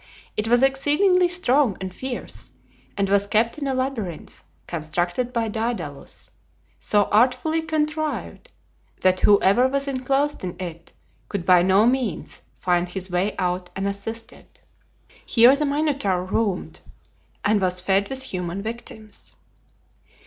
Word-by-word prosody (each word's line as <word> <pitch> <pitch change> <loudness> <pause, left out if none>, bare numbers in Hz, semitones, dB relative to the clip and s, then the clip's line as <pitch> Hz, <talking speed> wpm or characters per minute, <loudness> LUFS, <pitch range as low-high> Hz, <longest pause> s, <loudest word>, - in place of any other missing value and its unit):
It 210 - -1
was 245 +2 +4
exceedingly 300 +7 +3
strong 285 - +2
and 190 -1 -6
fierce, 260 +2 -6 0.5
and 200 -1 +1
was 200 +1 +2
kept 230 +7 +1
in 280 - -3
a 265 - 0
labyrinth 245 - -4 0.2
constructed 175 +9 -2
by 230 -2 -1
Daedalus, 225 +2 -4 0.5
so 205 -1 +3
artfully 250 +8 +3
contrived 310 -1 -3 0.5
that 185 0 +3
whoever 205 +4 +5
was 275 +1 -1
enclosed 275 +1 0
in 180 -2 -4
it 170 -2 -7 0.4
could 195 -4 -3
by 180 -1 +6
no 190 +4 +4
means, 245 -8 -1 0.2
find 175 -1 0
his 185 0 -6
way 180 +4 0
out 180 0 -2
unassisted. 200 +4 -5 0.8
Here 240 +3 +6
the 300 +1 0
Minotaur 280 -11 0
roamed, 195 -1 -2 0.6
and 210 -1 +3
was 180 -1 +1
fed 195 +2 +1
with 265 -1 -1
human 185 -4 -4
victims. 220 -1 -9
220 Hz, 125 wpm, -23 LUFS, 185-265 Hz, 0.8 s, by